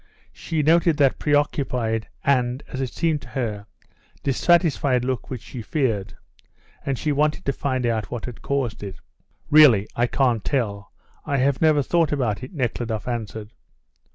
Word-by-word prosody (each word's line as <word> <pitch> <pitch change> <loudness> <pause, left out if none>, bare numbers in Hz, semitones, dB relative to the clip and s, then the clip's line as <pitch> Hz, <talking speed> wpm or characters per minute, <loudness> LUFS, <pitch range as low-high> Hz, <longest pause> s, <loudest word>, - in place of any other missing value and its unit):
She 160 -2 -2
noticed 165 +1 +4
that 140 -3 +3
preoccupied 125 -6 0 0.2
and, 125 -1 +1
as 130 - -4
it 130 - -2
seemed 160 -3 0
to - - -12
her, 105 -6 -4 0.6
dissatisfied 140 -3 +2
look 130 -2 -3
which 125 -4 -6
she 125 - -8
feared, 110 -7 -1 0.7
and 135 -2 -2
she 150 - -1
wanted 150 +4 0
to 140 - +1
find 130 -3 -2
out 110 -3 -1
what 120 -3 -5
had 125 -3 -8
caused 135 -6 -2
it. 100 -2 -6 0.6
"Really, 135 -10 +7
I 120 +1 +2
can't 120 -4 +1
tell; 100 -7 -2 0.3
I 140 - -1
have 135 +1 +1
never 155 -3 +4
thought 165 +2 +1
about 125 -8 -1
it," 130 - -8
Nekhludoff 120 - -3
answered. 110 -2 -4
130 Hz, 155 wpm, -23 LUFS, 115-145 Hz, 0.7 s, Really